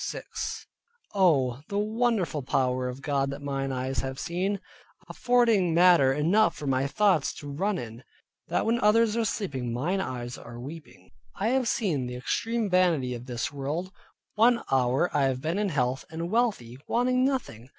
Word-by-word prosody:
Oh! 140 - +2
the 200 - -2
wonderful 215 -6 0
power 125 -1 0
of 130 +2 -8
God 140 -2 0
that 140 +1 -5
mine 135 -1 -2
eyes 130 0 -2
have 130 +1 -4
seen, 185 +6 -2 0.5
affording 230 -9 +2
matter 170 -6 +6
enough 170 +10 +2
for 150 - -7
my 135 0 +1
thoughts 185 -2 +2
to 145 - -9
run 190 +7 -1
in, 115 -3 -8 0.4
that - - 0
when 230 +2 +1
others 215 +1 +4
are 230 - +1
sleeping 140 - -3
mine 170 +11 -1
eyes 125 -6 -5
are 120 +1 -10
weeping. 150 +5 -11 0.2
I 210 +3 0
have 260 -1 +1
seen 160 - 0
the 125 - -6
extreme 225 - -1
vanity 175 -9 +2
of 120 +1 -8
this 125 +3 -3
world: 150 +7 -3 0.4
One 235 +2 +4
hour 130 +5 +2
I 140 -2 +3
have 130 -1 0
been 160 +8 -2
in 210 -1 0
health, 130 -4 -1
and 165 +2 -5
wealthy, 200 - 0
wanting 255 +1 +2
nothing. 220 - -2
155 Hz, 165 wpm, -27 LUFS, 130-210 Hz, 0.5 s, matter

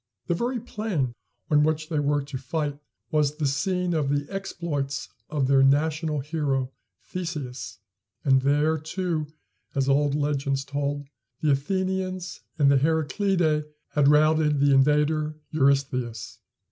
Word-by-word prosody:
The - - 0
very 240 +7 -1
plain 190 - -2 0.4
on 150 -1 +5
which 155 +1 0
they 155 -3 0
were 145 0 +1
to 140 -1 -6
fight 145 +2 -3 0.3
was 150 -1 +2
the 150 -1 -2
scene 180 +6 0
of 150 -4 0
the 145 0 0
exploits 145 -8 -3 0.2
of 150 -3 0
their 135 0 +4
national 150 +2 +2
hero, 140 -3 -1 0.3
Theseus; 150 - -5 0.5
and 135 -2 +5
there, 150 +3 +2
too, 160 -1 -2 0.5
as 135 -1 +1
old 140 +1 +3
legends 140 -2 0
told, 145 0 -3 0.3
the 150 - +3
Athenians 185 +4 -1 0.2
and 140 -2 +5
the 140 - +5
Heraclidæ 160 +1 +1 0.2
had 145 -2 +2
routed 150 0 +4
the 140 0 +4
invader, 150 +2 +3 0.2
Eurystheus. 135 -5 0
150 Hz, 135 wpm, -26 LUFS, 140-160 Hz, 0.5 s, on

